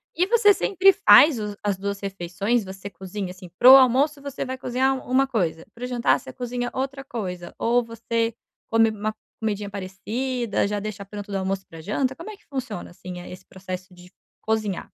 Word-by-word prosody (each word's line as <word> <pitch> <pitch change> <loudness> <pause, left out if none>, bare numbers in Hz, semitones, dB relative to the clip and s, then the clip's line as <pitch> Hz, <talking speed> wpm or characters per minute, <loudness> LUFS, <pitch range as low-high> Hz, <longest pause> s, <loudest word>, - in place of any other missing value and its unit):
E 360 +3 +2
você 425 -3 +6
sempre 390 0 +4
faz 320 - +7
os 210 -1 -4
as 205 -1 +1
2 200 0 -3
refeições, 195 +4 -1
você 190 +1 -8
cozinha, 190 -1 -6
assim, 180 -1 -12
para 255 +2 +9
o - - +12
almoço 270 +3 +4
você 280 -2 -5
vai 260 0 -4
cozinhar 260 +1 +1
uma 265 +1 +4
coisa, 175 -10 -1
para 240 - -10
o - - -2
jantar 245 -1 +2
você - - -10
cozinha 245 -1 -3
outra 270 +1 -3
coisa, 180 -9 -5
ou 240 +1 +2
você 230 0 -2 0.3
come 225 0 +4
uma 215 0 -3 0.2
comidinha 210 -2 -2
parecida, 210 +4 -2
já 205 0 -2
deixa 205 -1 -6
pronto 205 0 -8
do 195 - -1
almoço 190 0 -2
e - - -47
pra 165 -1 -11
janta, 255 - -1
como 335 +9 -9
é 420 - -9
que - - -30
funciona, 255 -9 -5
assim, 180 0 -8
a 175 - -10
eh, - - -9
esse 185 0 -11
processo 185 0 -7
de 180 0 -16 0.3
cozinhar? 215 -4 -1
220 Hz, 205 wpm, -24 LUFS, 195-255 Hz, 0.3 s, o